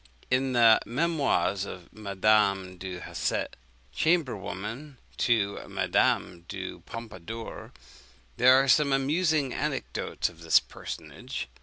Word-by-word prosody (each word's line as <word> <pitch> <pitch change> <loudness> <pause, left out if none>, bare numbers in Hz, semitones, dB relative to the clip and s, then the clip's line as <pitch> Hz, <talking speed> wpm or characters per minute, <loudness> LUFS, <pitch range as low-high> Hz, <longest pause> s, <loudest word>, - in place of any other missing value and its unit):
In 130 +1 +2
the 115 -2 +7
Memoirs 130 - +1
of 90 -3 -9
Madame 100 -2 +1
du 90 -1 -6
Hausset, - - -2 0.4
chamber 160 -7 +2
woman 110 +9 -7 0.2
to 105 -4 +1
Madame 85 -2 +1
du - - -6
Pompadour, 115 -1 -8 0.7
there 130 +1 +7
are 135 +1 +4
some 140 +1 +4
amusing 150 0 +1
anecdotes - - -2
of 85 -1 -12
this 80 -1 +5
personage. - - -7
115 Hz, 110 wpm, -28 LUFS, 95-135 Hz, 0.7 s, the